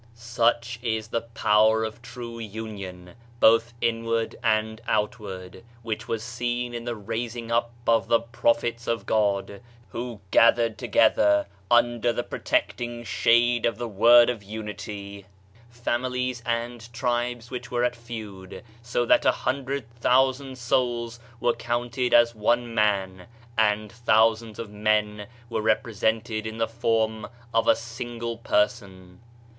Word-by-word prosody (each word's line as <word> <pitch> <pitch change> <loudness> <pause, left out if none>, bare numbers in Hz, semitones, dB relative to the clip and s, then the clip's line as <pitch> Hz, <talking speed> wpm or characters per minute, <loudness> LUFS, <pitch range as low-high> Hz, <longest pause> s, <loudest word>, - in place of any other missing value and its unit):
Such 115 0 0
is 110 -2 -2
the 115 - -1
power 110 -1 +3
of 110 +1 -5
true 120 -1 -8
union, 100 -5 -7 0.3
both 115 +1 +5
inward 115 0 0
and 110 0 +1
outward, 105 -3 -3 0.2
which 110 0 -4
was 115 -2 -2
seen 120 +1 -3
in 120 0 -5
the 120 -1 -3
raising 115 +2 -5
up 120 0 +1 0.2
of 115 -1 +3
the 115 - +4
Prophets 115 0 0
of 115 -1 -1
God, 100 -1 0 0.3
who 120 -2 -6
gathered 115 -1 +4
together 105 -3 +3 0.2
under 120 0 +3
the 120 +1 -2
protecting 120 -1 -2
shade 120 +1 +3
of 115 -3 -2
the 120 0 -4
Word 120 +3 +6
of 115 -4 -7
Unity 100 -1 -7 0.4
families 125 +1 -2
and 120 0 -3
tribes 120 -1 -2
which 125 0 -6
were 120 0 0
at 125 0 +1
feud, 110 -5 -9 0.2
so 120 +1 -1
that - - +4
a - - +5
hundred 135 -2 -3
thousand 130 +2 +2
souls 120 -1 -1 0.2
were 120 - +2
counted 120 +1 -2
as 120 0 +5
one 120 +2 0
man, 95 -4 0 0.3
and 105 -1 +1
thou 110 +1 +6
sands 110 -1 -11
of 115 -3 -6
men 105 0 0 0.2
were 115 -1 -2
represented 110 0 0
in 110 0 -6
the 115 0 0
form 110 -1 0 0.3
of 115 0 +2
a - - +6
single 115 0 -6
Person. 100 -6 -1
115 Hz, 135 wpm, -25 LUFS, 110-120 Hz, 0.4 s, Word